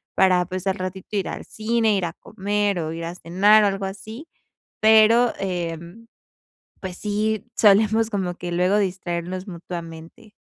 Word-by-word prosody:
para, 185 -2 +4
pues, 185 +1 -5
al 190 - +1
ratito 185 +2 -6
ir 190 - -2
al - - -7
cine, 220 0 0
ir 190 -3 0
a 165 - -4
comer, 205 0 -2
o 160 -1 -3
ir 165 0 -5
a 170 - -6
cenar". 195 +5 +4
O - - +4
algo 195 0 -2
así. 220 +9 -8 0.5
Pero, 220 +2 +5
em, 175 +3 -5 0.7
pues, 185 -2 -6
sí 215 0 -1
solemos 215 +2 +4
como 190 -4 -2
que 175 -1 -6
luego 180 +4 +2
distraernos 185 -1 -3
mutuamente. 170 +4 -9
195 Hz, 155 wpm, -23 LUFS, 175-215 Hz, 0.7 s, Pero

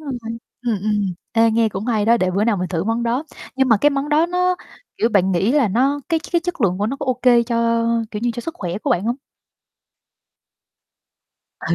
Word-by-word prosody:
rồi, 295 -3 -7 0.5
ừm, 230 -4 0
ừm. 205 -3 0 0.2
Ê, 230 0 +4
nghe 225 0 +2
cũng 200 +1 -5
hay 220 -4 +1
đó, 230 +2 +4
để 185 -5 0
bữa 200 +3 +1
nào 225 -3 +2
mình 180 0 -3
thử 170 -1 -2
món 225 +2 -1
đó. 245 +6 -1 0.3
Nhưng 265 -1 +2
mà 225 - +5
cái 290 +8 +3
món 280 0 -2
đó 305 +2 +3
nó, 360 +1 +1 0.4
kiểu, 225 - +2
bạn 190 -4 +2
nghĩ 190 +8 +1
là 285 -7 +3
nó 265 +8 +1
cái 330 -2 +2
cái 340 - +3
chất 350 -4 -5
lượng 185 -3 +1
của 205 - 0
nó 270 +5 -3
có 285 - -6
ô 255 - +2
kê 240 -2 +5
cho, 230 -1 0 0.3
kiểu 210 - -5
như, 240 - +1
cho 235 - -5
sức 330 +7 -6
khỏe 180 - -4
của - - -3
bạn 180 - +1
hông? 235 +2 -1 2.4
Ừ. - - -1
230 Hz, 230 wpm, -20 LUFS, 205-275 Hz, 2.4 s, mà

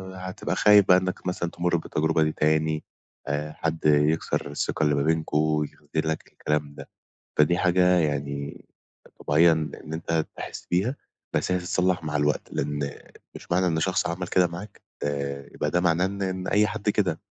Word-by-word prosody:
هتبقى 95 0 -4
خايف 105 0 +6
بقى 90 - +7
إنك 95 0 -3
مثلًا 90 -1 -2
تمُر 85 0 0
بالتجربة 80 0 +1
دي 75 - +1
تاني، 80 0 +1 0.4
آآ، 75 +1 -2
حد 80 0 -3
يكسر 75 0 +2
الثقة 75 - -1
اللي 75 -1 +3
ما 70 - +1
بينكم، 75 -1 +1
يخذُلك 80 +1 -3
الكلام 75 -1 -2
ده. - - -10 0.5
فدي 75 +3 +4
حاجة 90 0 +3 0.2
يعني، 70 -2 -3 0.6
طبيعية 80 +3 +5
إن 80 -1 -4
أنت 80 -1 -1
تحِس - - -7
بيها، 100 +10 +1 0.4
بس - - +1
هي 90 - +2
تتصلح 90 -1 0
مع 75 -1 -1
الوقت، 75 0 0
لأن 70 0 -2 0.5
مش - - -13
معنى 90 +1 +3
إن 80 -2 +1
شخص 95 +3 +1
عمل 85 +1 -3
كده 90 -1 +4
معاك 90 +4 -9 0.2
آآ، 70 -1 -3
يبقى 75 - -1
ده 90 - +2
معناه 85 0 +2
إن 100 +1 -4
إن 95 -1 -3
أي 105 +1 +4
حد 105 -1 -4
كده. 95 -6 0
80 Hz, 170 wpm, -25 LUFS, 75-90 Hz, 0.6 s, بقى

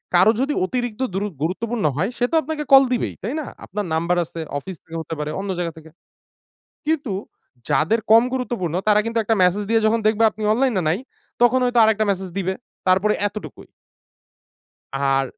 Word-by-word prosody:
কারো 220 - +6
যদি 290 +2 0
অতিরিক্ত 245 +2 -3
দুরু 200 +2 -1 0.2
গুরুত্বপূর্ণ 215 +4 -2
হয় 190 +7 0
সে 245 - +2
তো - - +1
আপনাকে 300 +1 -4
কল 270 - +10
দিবেই, 245 - -1
তাই 225 - -2
না? - - -7 0.2
আপনার 205 +1 -4
নাম্বার 170 +2 +1
আছে 165 - -9 0.2
অফিস 190 +5 -8
থেকে 165 0 -8
হতে 160 - -6
পারে, 150 0 -3
অন্য 195 0 -4
জায়গা 170 -1 -2
থেকে। 160 0 -13 1.0
কিন্তু 290 -9 0 0.6
যাদের 155 +11 +2
কম 225 +1 +8
গুরুত্বপূর্ণ 235 -10 -2
তারা 210 0 +5
কিন্তু 230 0 -1
একটা 225 +1 +1
মেসেজ 185 +3 +3
দিয়ে 225 0 +4
যখন 225 +1 +2
দেখবে 220 +1 +3
আপনি 215 - -9
অনলাইন 250 +1 +1
এ - - -2
নাই 165 +6 +1 0.4
তখন 245 +2 +5
হয়তো 245 -1 +1
আরেকটা 220 0 +3
মেসেজ 190 -1 -2
দিবে। 190 -1 -1 0.3
তারপরে 190 +3 +3
এতটুকুই। 210 +1 -9 1.3
আর 135 0 +2
210 Hz, 180 wpm, -21 LUFS, 180-235 Hz, 1.3 s, কল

